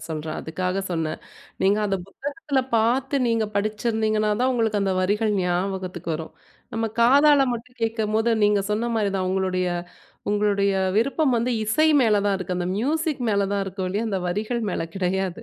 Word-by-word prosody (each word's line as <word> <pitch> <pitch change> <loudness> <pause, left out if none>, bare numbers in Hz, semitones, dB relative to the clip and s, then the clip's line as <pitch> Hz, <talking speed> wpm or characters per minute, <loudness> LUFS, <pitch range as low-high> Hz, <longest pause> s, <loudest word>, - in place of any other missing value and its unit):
சொல்றேன், 155 0 -4
அதுக்காக 180 +4 -2
சொன்னன். 165 -2 -2 0.4
நீங்க 200 +2 +3
அத 195 - 0
புத்தகத்துல 285 - -2
பாத்து 250 +5 +2
நீங்க 230 -1 +1
படிச்சிருந்திங்கனா 215 +1 0
தான், 255 +1 +3
உங்களுக்கு 220 -4 +1
அந்த 195 -1 +1
வரிகள் 210 +3 +1
ஞாபகத்துக்கு 180 -1 -2
வரும். 160 +1 -6 0.4
நம்ப 225 0 0
காதால 280 +3 +6
மட்டும் 245 +2 -8
கேட்கும்போது 220 0 0
நீங்க 205 -1 +3
சொன்ன 225 +3 0
மாரிதான் 195 -3 0
உங்களுடைய 185 -1 0 0.6
உங்களுடைய 205 -1 +2 0.3
விருப்பம் 275 +3 +2
வந்து 235 +2 0
இசை 310 +9 +3
மேல 220 -3 +4
தான் 200 -1 +2
இருக்கு. 185 -1 -3
அந்த 175 0 -2
மியூசிக் 300 - -1
மேல 200 -1 +1
தான் 200 - 0
இருக்கு 190 0 -4
ஒழிய, 205 +5 -1
அந்த 195 -3 -1
வரிகள் 215 +6 -2
மேல 165 - -2
கிடையாது. 190 +2 -1
210 Hz, 155 wpm, -24 LUFS, 190-235 Hz, 0.6 s, காதால